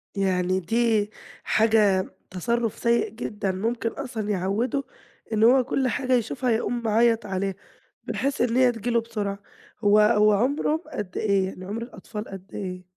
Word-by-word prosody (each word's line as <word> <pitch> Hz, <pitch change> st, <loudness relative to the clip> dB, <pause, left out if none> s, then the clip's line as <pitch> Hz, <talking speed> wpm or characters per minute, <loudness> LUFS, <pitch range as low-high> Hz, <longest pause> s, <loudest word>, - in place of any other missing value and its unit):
يعني 185 Hz, -1 st, +1 dB
دي 220 Hz, +2 st, +1 dB, 0.3 s
حاجة 215 Hz, -4 st, +3 dB, 0.2 s
تصرف 230 Hz, +5 st, -1 dB
سيء 235 Hz, 0 st, +2 dB
جدًا، 210 Hz, -3 st, -3 dB
ممكن 230 Hz, +5 st, -1 dB
أصلًا 235 Hz, -5 st, -5 dB
يعوده 210 Hz, +8 st, 0 dB, 0.5 s
إن 215 Hz, 0 st, +2 dB
هو 255 Hz, +3 st, +6 dB
كل 265 Hz, +1 st, 0 dB
حاجة 255 Hz, +1 st, 0 dB
يشوفها 250 Hz, +1 st, 0 dB
يقوم 235 Hz, +1 st, 0 dB
معيط 230 Hz, +1 st, +3 dB
عليها، 195 Hz, 0 st, -2 dB, 0.5 s
بحيث 275 Hz, +1 st, -1 dB
إن 240 Hz, -1 st, +1 dB
هي 255 Hz, -1 st, +5 dB
تيجي 230 Hz, 0 st, -4 dB
له 235 Hz, -1 st, +2 dB
بسرعة. 205 Hz, -3 st, -4 dB, 0.4 s
هو 210 Hz, -1 st, +4 dB
هو 210 Hz, 0 st, +5 dB
عمره 285 Hz, -, +1 dB
قد 200 Hz, -3 st, -5 dB
إيه؟ 200 Hz, -3 st, +2 dB
يعني 185 Hz, -1 st, -7 dB
عمر 210 Hz, +4 st, -4 dB
الأطفال 220 Hz, -2 st, -8 dB
قد 195 Hz, 0 st, -10 dB
إيه؟ 185 Hz, -2 st, -5 dB
220 Hz, 155 wpm, -25 LUFS, 195-235 Hz, 0.5 s, هو